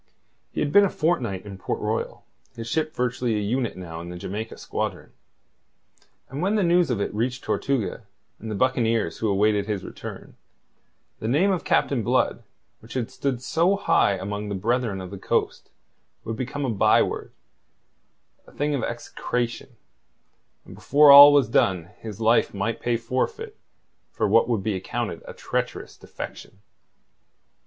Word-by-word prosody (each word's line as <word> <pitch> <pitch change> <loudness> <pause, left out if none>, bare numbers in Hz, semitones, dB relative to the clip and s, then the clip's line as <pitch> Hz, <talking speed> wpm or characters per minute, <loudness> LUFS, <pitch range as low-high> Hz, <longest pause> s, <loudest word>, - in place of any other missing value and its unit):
He - - -3
had 145 - 0
been 205 +6 +7
a 200 - +3
fortnight 125 - -1
in 100 -2 -9
Port - - -3
Royal, - - -3 0.3
his 115 -1 -7
ship 155 +5 -1
virtually 125 -2 -1
a - - 0
unit 115 +2 -1
now 85 -3 -7
in 85 - -8
the 90 - -7
Jamaica 105 +5 -6
squadron. - - -4 1.2
And 135 +3 -6
when 195 +4 +1
the 210 - +2
news 175 -1 +3
of 120 -5 0
it 100 - -2
reached 125 +4 -2
Tortuga 115 -5 -2 0.3
and 110 - -7
the 105 - -3
buccaneers 115 -6 +1
who 110 - 0
awaited 100 +1 +2
his 105 -4 -2
return, - - -9 0.8
the 110 - -4
name 160 - +3
of 185 - -1
Captain 135 -4 +1
Blood, 125 +4 +1 0.4
which 110 +2 -12
had 120 -3 -2
stood 130 -3 -3
so 170 +8 +2
high 200 - +2
among 105 +2 -4
the 100 - -2
Brethren 110 0 -1
of 90 0 -8
the 100 - -7
Coast, - - -1 0.5
would 115 - -4
become 130 +4 -3
a 125 - -1
byword, 105 - +2 1.2
a - - -15
thing 145 +1 -1
of 140 - -1
execration, 120 +1 -4 0.9
and - - -12
before 145 +1 +5
all 145 +1 +12
was 145 -4 +4
done 95 -5 +1
his 110 -2 -8
life 115 -1 +2
might 105 +3 -2
pay 120 -1 +1
forfeit 130 - -3 0.6
for - - 0
what - - +4
would 110 -5 0
be 110 - 0
accounted 95 - -4
a - - -7
treacherous - - -4
defection. - - -9
115 Hz, 165 wpm, -24 LUFS, 105-140 Hz, 1.2 s, all